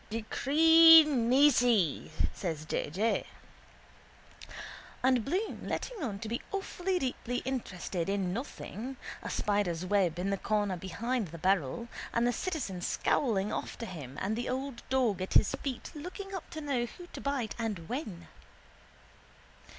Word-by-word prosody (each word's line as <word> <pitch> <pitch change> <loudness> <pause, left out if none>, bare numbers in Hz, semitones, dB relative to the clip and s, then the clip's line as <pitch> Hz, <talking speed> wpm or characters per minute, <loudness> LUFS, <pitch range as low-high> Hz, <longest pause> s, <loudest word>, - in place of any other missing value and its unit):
—Decree 320 +8 +7
nisi, 245 - +3 0.2
says 160 -5 -4
J. - - -2
J. 210 +9 0 1.8
And 255 -3 +3
Bloom 370 - -2
letting 485 -5 -4
on 220 -9 -2
to 220 - -6
be 235 +2 -3
awfully 385 -1 -2
deeply 250 -5 -3
interested 190 -8 -3
in 195 -3 0
nothing, 250 +1 -6 0.2
a - - -5
spider's 195 -5 0
web 185 -4 +2
in 190 +3 -1
the 200 - 0
corner 205 -3 0
behind 200 +6 -2
the 165 +1 -9
barrel, 185 - 0 0.3
and 235 +1 +3
the 245 - +2
citizen 250 - -3
scowling 210 0 +1
after 230 - -4
him 145 - -8
and 205 +3 -1
the 240 +1 -3
old 260 -1 -3
dog 245 -8 +1
at 185 - -3
his - - +6
feet 260 -4 -4
looking 370 +6 -7
up 380 - -6
to 315 - -6
know 265 -5 -1
who 355 +8 -11
to - - -7
bite 275 -6 -1
and 205 -8 -3
when. 215 - -5
230 Hz, 145 wpm, -31 LUFS, 190-275 Hz, 1.8 s, Decree